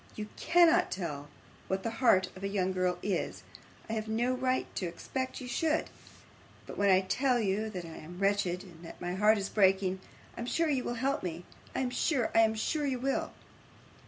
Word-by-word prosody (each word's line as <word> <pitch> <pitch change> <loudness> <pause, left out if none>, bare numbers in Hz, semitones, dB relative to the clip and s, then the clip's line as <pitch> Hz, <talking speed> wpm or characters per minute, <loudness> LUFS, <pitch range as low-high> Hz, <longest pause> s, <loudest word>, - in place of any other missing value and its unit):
You 210 0 -5
cannot 345 +1 +4
tell 150 -6 -4 0.4
what 190 0 -1
the 230 - -1
heart 190 -7 +5
of 190 - -10
a - - 0
young 190 -2 0
girl 180 -1 0
is 195 -2 -2 0.4
I 220 - -4
have 220 -1 -2
no 235 +3 +1
right 255 0 0
to 185 - -1
expect 260 +9 -4
you 255 - -7
should; 315 +5 0 0.7
but - - -8
when 200 0 +2
I 190 0 +6
tell 250 +6 +1
you 215 +1 0
that 180 -5 -6
I 165 - -9
am 175 +3 -10
wretched, 195 -2 +1
and 170 -3 -14
that 165 - -10
my 175 0 -3
heart 210 +3 +4
is 195 -1 -2
breaking, 190 -2 +2 0.4
I - - -10
am 235 - -4
sure 330 +4 +1
you 265 -4 +1
will 240 - -2
help 270 +4 0
me. 175 -1 -5 0.3
I - - 0
am 250 -1 -1
sure, 250 -1 +1
I - - +5
am 220 -1 +4
sure 290 +7 -1
you 260 -2 0
will! 270 +2 -1
210 Hz, 210 wpm, -31 LUFS, 185-255 Hz, 0.7 s, I